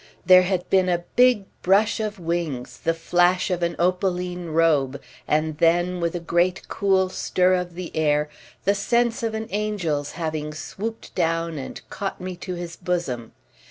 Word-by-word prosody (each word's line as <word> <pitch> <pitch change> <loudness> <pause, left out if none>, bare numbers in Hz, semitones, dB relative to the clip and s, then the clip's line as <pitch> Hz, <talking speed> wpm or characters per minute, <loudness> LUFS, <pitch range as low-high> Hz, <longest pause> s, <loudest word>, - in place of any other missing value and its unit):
There 185 0 +8
had 180 -1 -1
been 185 -1 +4
a 175 -1 0
big 245 -5 +5 0.2
brush 200 +5 +3
of 215 -1 -3
wings, 165 -7 -3
the 165 - 0
flash 175 +3 +2
of 180 -1 -1
an 170 -1 0
opaline 180 0 0
robe, 150 -4 +2 0.3
and 155 0 0
then, 175 +2 +3
with 170 0 -1
a - - -1
great 175 +2 0
cool 190 -2 +2
stir 185 0 +1
of 180 -1 -1
the 180 -1 -7
air, 150 -1 +2 0.4
the 200 - +4
sense 235 +3 +1
of 225 -1 -2
an 220 0 -4
angel's 185 -9 -1
having 155 -2 -3
swooped 215 +8 -6
down 165 -2 0
and 130 - -8
caught 195 -1 -4
me 185 0 -5
to 180 +1 -5
his 175 -1 -6
bosom. 170 -11 -3
175 Hz, 165 wpm, -24 LUFS, 165-190 Hz, 0.4 s, There